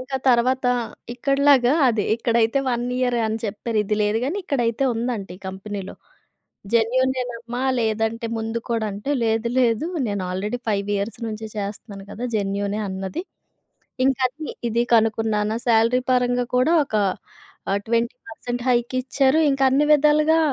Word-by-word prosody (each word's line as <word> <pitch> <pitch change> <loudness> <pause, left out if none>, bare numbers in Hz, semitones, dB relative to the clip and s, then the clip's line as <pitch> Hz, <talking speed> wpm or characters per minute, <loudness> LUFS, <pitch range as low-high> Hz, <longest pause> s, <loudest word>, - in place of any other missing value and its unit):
ఇంకా 265 +1 -4
తర్వాత 255 +2 +3 0.5
ఇక్కడలాగా 275 0 +3 0.2
అది 220 -4 +1
ఇక్కడైతే 230 +2 +1
1 240 0 -1
ఇయరే 245 -2 +1
అని 220 +1 -2
చెప్పారు. 215 +1 -2
ఇది 210 - 0
లేదు 210 +2 +1
కానీ, 310 +9 -2
ఇక్కడైతే 240 -4 0
ఉందంట 230 -3 -2
ఈ - - -18
కంపెనీలో. 195 0 -6 0.8
జెన్యూనేనమ్మా 245 0 0 0.2
లేదంటే 225 +1 -1
ముందు 225 +1 -3
కూడా 230 -2 0
అంటే, 210 +9 -4
లేదు, 225 +1 +1
లేదు 240 +5 +2 0.2
నేను 200 -2 -2
ఆల్రెడీ 210 +6 -3
5 200 -1 -1
ఇయర్స్ 205 +3 -4
నుంచి 220 0 -5
చేస్తున్నాను 200 -1 -6
కదా! 240 - -7
జెన్యూనే 200 +1 -1
అన్నది. 190 - -4 0.8
ఇంక 265 -1 +3
అది, 300 +4 -8 0.2
ఇది 235 +1 +1
కనుక్కున్నాన, 220 -1 +2 0.2
శాలరీ 230 +2 +3
పరంగా 245 -1 +1
కూడా 310 +7 +3
ఒక 220 - -11 0.8
ఆహ్, 200 - +2
20% 235 +1 -3
హైకిచ్చారు. 255 +4 +1
ఇంకా 270 0 0
అన్ని 280 +3 +3
విధాలుగా 300 +2 +4
235 Hz, 135 wpm, -22 LUFS, 215-255 Hz, 0.8 s, విధాలుగా